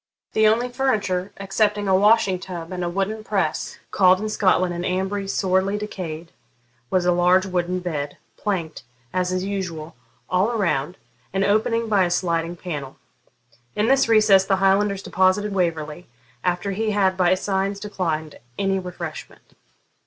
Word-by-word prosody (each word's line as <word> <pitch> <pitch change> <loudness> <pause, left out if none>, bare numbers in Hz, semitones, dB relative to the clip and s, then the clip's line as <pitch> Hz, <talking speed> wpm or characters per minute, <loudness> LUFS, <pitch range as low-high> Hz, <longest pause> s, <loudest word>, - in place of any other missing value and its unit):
The 220 0 +4
only 230 +3 +2
furniture, 215 -8 -1
excepting 205 +1 0
a 190 - +4
washing 205 -2 +4
tub 175 -2 -7
and 180 -1 -3
a 175 - -1
wooden 195 +4 -2
press, - - -2
called 185 -1 +5
in 215 +1 -3
Scotland 185 -4 +2
an 175 - -4
ambry, 190 +2 -2
sorely 190 +1 +1
decayed, 175 -6 -6 0.6
was 185 -1 +1
a 180 - +4
large 180 +2 +4
wooden 180 -1 -1
bed, 150 -5 -4 0.2
planked, 170 -7 -3 0.3
as 180 0 0
is 185 0 -1
usual, 180 -5 -4 0.3
all 185 +4 +2
around, 180 - -1 0.4
and 195 0 +1
opening 225 +3 +1
by 205 -3 +3
a - - -1
sliding 170 -1 -1
panel. 150 -7 -6 0.8
In 210 - +1
this 270 -3 +3
recess 215 -4 +6
the 195 0 +1
Highlanders 195 +1 +2
deposited 190 +2 +1
Waverley, 165 -3 -2 0.4
after 180 +2 -1
he 215 +3 -1
had 195 -3 +2
by 185 0 +3
signs 195 +1 -1
declined 165 -7 -3 0.2
any 195 -1 +1
refreshment. 175 -3 -8
190 Hz, 150 wpm, -23 LUFS, 175-205 Hz, 0.8 s, recess